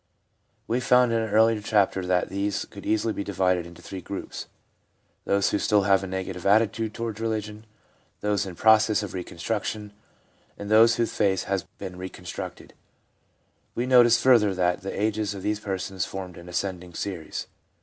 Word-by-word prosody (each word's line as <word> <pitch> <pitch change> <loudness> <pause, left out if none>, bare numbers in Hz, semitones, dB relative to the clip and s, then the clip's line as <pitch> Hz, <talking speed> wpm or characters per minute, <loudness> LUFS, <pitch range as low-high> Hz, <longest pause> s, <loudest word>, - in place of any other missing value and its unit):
We 120 +2 +1
found 125 -1 +4
in 115 - +2
an 110 - -3
earlier 110 +1 +4
chapter 100 -3 +1
that 90 0 +1
these 100 0 -2
could 100 - -11
easily 110 +1 +1
be 100 - -3
divided 90 -3 0
into 85 0 -14
three 95 -1 -7
groups 100 +3 -6 0.4
— - - -44
those 100 0 +2
who 105 - +1
still 105 -1 +3
have 95 0 +3
a - - -4
negative 95 -1 -5
attitude 110 +2 +2
toward 115 -2 -4
religion, 110 -1 -3 0.5
those 105 -1 0
in 90 - -7
process 110 +1 +4
of 105 - -6
reconstruction, 105 +3 -4 0.6
and 100 +1 -6
those 115 +1 +6
whose 115 -1 -1
faith 95 -3 +2
has 95 -2 -2
been 95 -2 -7
reconstructed; 90 -2 -7 1.0
we 120 - -1
noticed 120 -2 +6
furthermore 110 -7 +5
that 90 -1 +1
the 95 +1 -5
ages 105 -1 0
of 95 - -8
these 105 0 -1
persons 95 -2 -3
formed 95 -2 -6
an 85 +1 -11
ascending 90 -1 -4
series. 90 -6 -4
100 Hz, 170 wpm, -26 LUFS, 95-110 Hz, 1.0 s, those